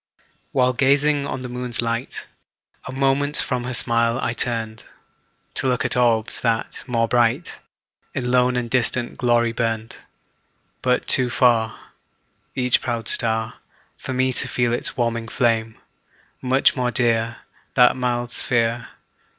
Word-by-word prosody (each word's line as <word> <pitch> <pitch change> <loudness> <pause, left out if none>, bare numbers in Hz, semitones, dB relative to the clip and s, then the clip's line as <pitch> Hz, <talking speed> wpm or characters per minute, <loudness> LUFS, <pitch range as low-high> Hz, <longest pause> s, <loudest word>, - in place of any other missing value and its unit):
While 125 -1 +2
gazing 140 +2 +3
on 130 0 -5
the - - -5
moon's 125 -1 -3
light, 115 +1 -3 0.6
A - - -6
moment 135 +2 0
from 125 -1 -2
her 125 - -4
smile 115 0 +2
I 115 - -2
turned, 115 -2 -1 0.7
To - - 0
look 125 -1 0
at - - +1
orbs, 115 -3 +1
that, 115 -2 -2
more 115 -2 0
bright, 120 +7 0 0.6
In 125 -2 -2
lone 125 0 +3
and 125 -1 -2
distant 120 0 +2
glory 120 -1 +2
burned. 115 -1 -3 0.9
But 125 -1 0
too 125 -2 +4
far 120 -3 +2 0.8
Each 125 -1 +1
proud 115 -2 -3
star, 110 -1 +1 0.4
For - - -8
me 130 0 0
to - - +2
feel 120 -1 0
its 120 - -3
warming 115 -2 -1
flame; 115 -1 0 0.7
Much 130 +1 +2
more 125 -2 -1
dear 115 -2 0 0.4
That 125 -2 +5
mild 120 -1 -2
sphere. 115 -1 0
120 Hz, 140 wpm, -21 LUFS, 115-125 Hz, 0.9 s, That